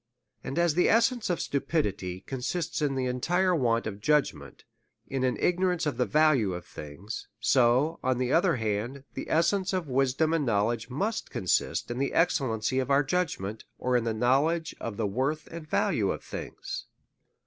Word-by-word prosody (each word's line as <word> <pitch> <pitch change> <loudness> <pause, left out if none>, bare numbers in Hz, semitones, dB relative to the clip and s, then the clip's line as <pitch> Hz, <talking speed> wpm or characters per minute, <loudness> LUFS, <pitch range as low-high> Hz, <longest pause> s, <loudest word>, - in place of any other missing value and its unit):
And 135 - -5
as 170 -2 +3
the 175 +3 +3
essence 230 0 +2
of 175 - 0
stupidity 100 - -2
consists 140 - -3
in 140 -2 +1
the 130 -1 -1
entire 175 +9 +1
want 115 -6 +1
of 105 -1 -5
judgment, 150 +4 0 0.4
in 135 -1 -2
an 130 -1 +1
ignorance 180 -1 +1
of 150 - -1
the 125 - +1
value 145 - +3
of 90 - -7
things; 85 - -8
so, 130 +6 +3
on 130 -1 +1
the 125 +1 0
other 170 -1 +4
hand, 115 +4 -2
the - - -6
essence 190 +4 +2
of 185 -4 -1
wis 130 -1 +1
dom 160 +2 +2
and 165 -2 +1
knowledge 115 0 0
must 205 - -2
consist 95 +5 0
in 120 - -3
the 140 - -1
excellency 130 -7 +1
of 130 0 -2
our 140 +1 +4
judgment, 135 - -2
or 125 0 0
in 120 - +3
the 115 - 0
knowledge 140 +9 +1
of 105 -3 -5
the 110 - 0
worth 130 +9 -1
and 165 -2 -8
value - - +1
of - - -3
things. - - -7
135 Hz, 180 wpm, -28 LUFS, 115-165 Hz, 0.4 s, other